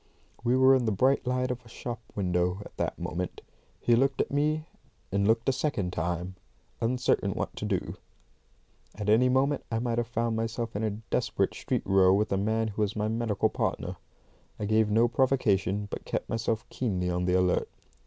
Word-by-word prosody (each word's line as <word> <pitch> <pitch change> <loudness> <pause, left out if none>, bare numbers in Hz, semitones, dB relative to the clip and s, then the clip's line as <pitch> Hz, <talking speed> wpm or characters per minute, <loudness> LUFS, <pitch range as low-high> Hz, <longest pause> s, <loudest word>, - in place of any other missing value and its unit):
We 125 +1 +3
were 130 +1 +7
in 130 -2 +3
the 110 - +1
bright 130 +6 +2
light 125 0 0
of 125 0 -5
a 115 - -16
shop 120 0 -6
window 90 0 0
at - - -13
that - - -2
moment. 90 +1 -4 0.4
He 120 - +3
looked 135 +3 +2
at - - 0
me, 155 +2 +1 0.5
and 100 +1 +2
looked 115 +1 +2
a - - +5
second 110 -10 -1
time, 85 +2 -2 0.5
uncertain 125 +2 +1
what - - -4
to - - -3
do. - - -2 1.0
At 105 0 -3
any 120 +4 +5
moment 135 +2 +2
I 115 - +1
might 120 0 0
have 120 - -1
found 115 -1 -1
myself 115 0 -3
in 100 - -1
a 110 - +1
desperate 105 +2 -1
street - - -2
row 95 -1 +5
with 105 +2 0
a 95 - +2
man 110 +3 0
who 105 +1 -4
was 105 -1 0
my 105 0 0
medical 110 -2 0
partner. - - -2 0.6
I 105 - -2
gave 110 +1 +3
no 115 +3 +4
provocation, 110 -6 +1
but - - -5
kept - - -3
myself 115 0 -2
keenly 90 -7 -1
on 90 0 -1
the 90 0 +2
alert. 90 -1 +2
110 Hz, 195 wpm, -28 LUFS, 100-125 Hz, 1.0 s, were